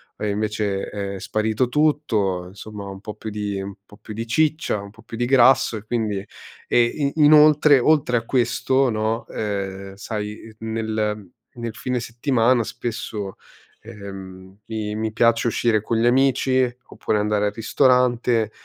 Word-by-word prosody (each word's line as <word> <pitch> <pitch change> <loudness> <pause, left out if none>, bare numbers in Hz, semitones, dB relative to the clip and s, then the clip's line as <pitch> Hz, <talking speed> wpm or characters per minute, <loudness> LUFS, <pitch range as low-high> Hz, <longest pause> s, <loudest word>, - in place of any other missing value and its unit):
è 105 - -5
invece 105 -1 -1
è 100 -1 -5
sparito 110 +5 0
tutto. 115 -12 +1
Insomma 100 +2 -9
un 95 0 -8
po' 105 0 -7
più 110 - -7
di 105 -2 -3
un 100 +1 -6
po' 105 - -17
più 110 +1 -10
di 115 +2 -5
ciccia, 155 -1 +1
un 100 0 -9
po' 115 - -18
più 115 +1 -9
di 120 - 0
grasso 130 -2 +4
e 105 - -9
quindi, 110 -3 -1
ehm, 95 +2 -7 0.4
e 130 +4 +2
inoltre 150 -1 +6
oltre 130 -2 +3
a 115 - -3
questo 130 +2 +1
no, 110 +1 -1
ehm, 100 -2 -4
sai 105 +2 -6
nel 110 -2 -3 0.2
nel 115 -2 -6
fine 125 +1 -2
settimana 120 +1 +1
spesso, 110 -4 -5 0.5
ehm, 95 -3 -10
mi 110 -2 -4
mi 110 0 -2
piace 115 +1 +3
uscire 115 -2 +1
con 115 - -2
gli 115 - +2
amici, 130 0 +3 0.2
oppure 105 - -2
andare 105 0 +1
al - - -1
ristorante 120 -2 +2
110 Hz, 155 wpm, -22 LUFS, 105-120 Hz, 0.5 s, inoltre